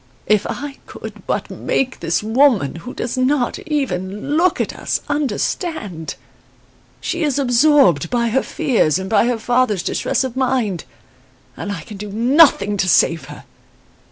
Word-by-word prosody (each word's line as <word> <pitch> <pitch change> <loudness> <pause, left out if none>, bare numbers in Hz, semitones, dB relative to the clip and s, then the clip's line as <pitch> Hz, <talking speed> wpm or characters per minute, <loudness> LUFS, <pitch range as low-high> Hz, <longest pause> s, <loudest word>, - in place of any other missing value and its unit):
"If 210 -2 +2
I 285 -1 -6
could - - -10
but - - -2
make 260 -1 -2
this 165 +4 -1
woman, 220 - +2
who 245 +10 -8
does 245 +1 -3
not 255 0 +1
even 250 - -2
look 345 +2 +2
at - - -1
us, - - -2
understand! 275 - -2 0.8
She 345 - -3
is 295 -4 +1
absorbed 245 - +4
by 235 -1 +1
her 265 +4 +2
fears 185 - +1
and 190 0 -4
by 225 +3 +3
her 245 -1 0
father's 230 -4 +1
distress - - 0
of 260 -2 -4
mind. 250 - 0 0.7
And 205 - -5
I 190 -6 -5
can 205 +6 -10
do 210 +1 -7
nothing 235 -3 +4
to 185 -1 +1
save 165 -4 +3
her. - - -11
240 Hz, 155 wpm, -19 LUFS, 195-275 Hz, 0.8 s, absorbed